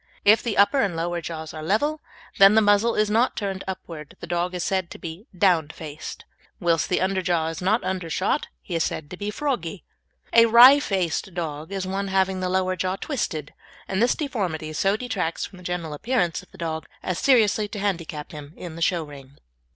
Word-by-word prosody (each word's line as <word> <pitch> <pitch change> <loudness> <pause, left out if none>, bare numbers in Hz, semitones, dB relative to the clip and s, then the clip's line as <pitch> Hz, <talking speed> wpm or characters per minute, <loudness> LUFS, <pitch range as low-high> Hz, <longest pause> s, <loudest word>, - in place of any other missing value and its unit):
If 215 +2 +6
the 230 -4 -3
upper 205 +8 +5
and 195 -5 0
lower 170 +1 -2
jaws 160 -2 -6
are 155 - -7
level, 290 - 0 0.4
and 195 +2 +8
the - - +7
muzzle 205 +2 +3
is 215 - +2
not 230 +4 +2
turned 195 -3 -3
upwards 165 -6 -7
the - - -7
dog 175 +1 -1
is 175 - -2
said 190 -3 -1
to - - -9
be 170 +6 -8
"down 175 -5 +3
faced," 155 -1 -8 0.3
whilst 165 -2 +2
if - - -11
the 180 - +1
underjaw 180 -4 0
is 165 - -7
not 210 +6 +2
undershot 180 -4 -1 0.2
he - - -7
is 165 -1 +1
said 145 -1 -4
to - - -5
be 205 +2 -3
"froggy." 210 - -3 0.5
A 230 0 +7
"wry 245 +5 +9
faced" 190 - -2
dog 160 -1 -4
is 195 -1 -3
one 195 +1 -2
having 190 -1 +1
the 185 0 -1
lower 185 0 +1
jaw 185 +1 -1
twisted, 170 - -3 0.3
and 190 +1 -1
this 240 - +3
deformity 180 - -3
so 195 +6 +1
detracts 210 -9 -2
from 190 - -12
the 180 - -13
general 175 -3 -3
appearance 175 - 0
of - - -20
the - - -17
dog 160 -2 -4 0.2
as 185 -1 -2
seriously 220 -5 +3
to 205 - -7
handicap 170 -7 -3
him 150 0 -10
in 170 -3 -8
the 165 - -8
show 170 -1 +1
ring. 140 -2 -13
185 Hz, 205 wpm, -24 LUFS, 165-205 Hz, 0.5 s, wry